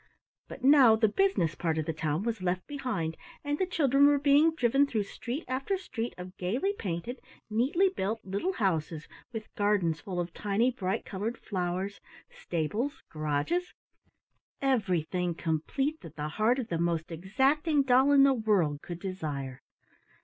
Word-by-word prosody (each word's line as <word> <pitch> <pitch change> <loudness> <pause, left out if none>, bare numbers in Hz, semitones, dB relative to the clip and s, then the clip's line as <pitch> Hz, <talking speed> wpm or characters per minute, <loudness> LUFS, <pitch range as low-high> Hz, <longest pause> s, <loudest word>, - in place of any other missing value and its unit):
But 265 - -10
now 265 -5 +7
the 220 0 +3
business 210 - +1
part 165 -2 -1
of 155 - -1
the 160 - -2
town 155 +2 -1
was 230 -3 -2
left 180 0 -1
behind, 245 - -3 0.3
and 290 0 -2
the 375 - +1
children 285 -5 +4
were 290 0 +4
being 290 +3 +4
driven 275 +1 +3
through 220 -6 -1
street 245 +8 -6
after 270 +10 -1
street 240 -10 -5
of 180 +1 -9
gaily 245 - -1
painted, 205 - -4 0.3
neatly 270 - +3
built, 225 - -2
little 200 - -1
houses 165 - -1 0.2
with 220 -2 -7
gardens 200 -6 +1
full 185 -3 -4
of 175 -1 -3
tiny 215 +5 +1
bright 200 -3 -2
colored 215 +4 -4
flowers, 185 +1 -3 0.3
stables, 210 - -3
garages 155 - -1 0.8
everything 180 - 0
complete 225 - -1
that 165 -1 -11
the 150 0 -3
heart 220 +9 +2
of 250 -4 -4
the 165 - -1
most 170 -1 -1
exacting 270 - +1
doll 265 +2 +4
in 280 -1 +7
the 275 -1 +5
world 195 - +1
could 175 -1 -7
desire. 150 -9 -5
215 Hz, 155 wpm, -29 LUFS, 170-275 Hz, 0.8 s, now